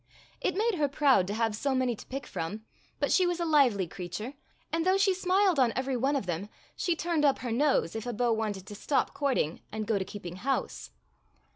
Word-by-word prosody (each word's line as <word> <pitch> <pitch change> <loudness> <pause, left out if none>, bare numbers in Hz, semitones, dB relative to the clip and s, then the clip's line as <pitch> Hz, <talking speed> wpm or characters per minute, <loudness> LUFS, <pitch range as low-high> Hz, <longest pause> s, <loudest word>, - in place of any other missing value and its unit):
It 365 - 0
made 435 -4 +1
her 290 - +3
proud 275 -9 +3
to 205 - -3
have 225 -1 0
so 270 +4 0
many 255 -2 +1
to - - -13
pick 275 +2 -5
from, 205 +7 -5 0.3
but - - +1
she 365 -2 +4
was 350 0 -1
a 340 - 0
lively 265 - +4
creature, 180 - -6 0.4
and 330 0 0
though 375 +2 +3
she 390 -1 +4
smiled 370 -2 +2
on 245 -3 +4
every 260 +1 -1
one 270 +4 +1
of 270 - -1
them 175 +3 -3 0.3
she 350 - 0
turned 330 -2 0
up 280 -2 +4
her 245 - -4
nose 265 - +2
if 225 +2 -4
a - - -1
beau 235 +1 +1
wanted 210 -4 -2
to 205 - -9
stop 265 +7 0
courting 260 - 0
and 215 0 -3
go 210 -2 +1
to - - -1
keep 205 0 -9
ing 175 +1 -6
house. 270 +7 -2
255 Hz, 230 wpm, -29 LUFS, 210-300 Hz, 0.4 s, she